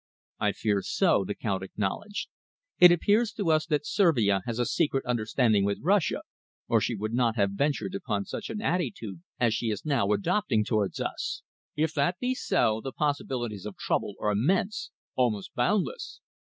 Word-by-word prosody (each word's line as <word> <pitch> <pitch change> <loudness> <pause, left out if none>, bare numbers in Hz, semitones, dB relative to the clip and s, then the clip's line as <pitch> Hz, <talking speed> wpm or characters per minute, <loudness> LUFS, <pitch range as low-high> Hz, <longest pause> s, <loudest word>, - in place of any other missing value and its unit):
"I - - +1
fear 105 -3 0
so," 170 - +2
the 100 +2 -4
Count 95 -3 -2
acknowledged. 105 - -3 0.5
"It 180 -1 +10
appears 205 +6 +3
to 195 -6 0
us 155 +1 +2
that 150 -3 0
Servia 115 - +3
has 115 -1 -2
a 120 - +1
secret 145 -2 0
understanding 115 -2 +2
with 100 0 0
Russia, 195 +1 +2 0.4
or - - +3
she - - -1
would 110 +2 -4
not 120 -2 +2
have 100 -3 +2
ventured 120 -2 -1
upon 100 -1 -2
such - - -6
an 220 0 -4
attitude 115 - -2 0.2
as 120 -3 +3
she 115 0 -1
is 105 +4 -4
now 135 -9 +1
adopting 110 - +1
towards 105 -3 0
us. - - -3 0.3
If 155 +1 0
that 155 +5 +1
be 250 +4 0
so, 110 - +1
the 135 - -4
possibilities 125 -9 -2
of 105 - -8
trouble - - -1
are 105 - +1
immense, 180 - 0 0.2
almost 110 -6 0
boundless. 205 - -1
120 Hz, 170 wpm, -28 LUFS, 105-165 Hz, 0.5 s, It